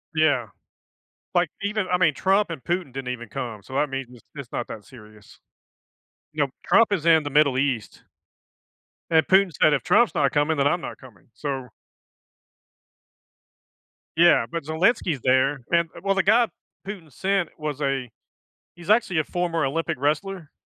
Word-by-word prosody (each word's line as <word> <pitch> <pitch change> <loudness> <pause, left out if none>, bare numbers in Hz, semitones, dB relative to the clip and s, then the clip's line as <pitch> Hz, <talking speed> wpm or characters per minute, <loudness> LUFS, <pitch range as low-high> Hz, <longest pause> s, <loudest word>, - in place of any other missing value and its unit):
Yeah. 145 -7 +2 0.9
Like, 175 -3 +3
even 205 -1 -1
I 180 - +3
mean, 165 -5 +3
Trump 195 +3 +1
and 160 -6 -7
Putin 175 -7 -2
didn't 135 -2 -5
even 120 -2 -9
come, 120 -5 -5
so 130 - -13
that 145 +1 +1
means 135 -2 -4
it's 125 -2 -16
it's 140 -4 -9
not 120 - -3
that 105 -2 -9
serious. 110 -4 -16 0.9
You - - +1
know, - - -2
Trump 230 -2 +4
is 170 -4 -2
in 160 -2 +5
the 145 - -4
Middle 145 -3 +3
East. 130 -6 -2 1.1
And 160 -1 +4
Putin 190 -1 +4
said, 155 - +6
"If 135 - 0
Trump's 215 +6 +3
not 140 -2 +2
coming, 150 +1 +1
then 140 0 +3
I'm 175 +4 0
not - - -7
coming." 115 -9 -17
So 135 -4 -5 2.5
Yeah. 175 +1 +5
But 170 -2 -3
Zelenski's 160 - +1
there. 130 +2 +2
And 170 -1 +2
well 195 0 +1
the 195 - +2
guy 230 +4 +4 0.4
Putin 180 -7 -8
sent 190 +3 -1
was 150 -2 -5
a 135 -3 -1 0.7
he's 175 +1 -12
actually 210 -6 +3
a 155 - +1
former 165 -3 -1
Olympic 165 +2 -2
wrestler. 155 +3 -2
155 Hz, 165 wpm, -24 LUFS, 135-180 Hz, 2.5 s, said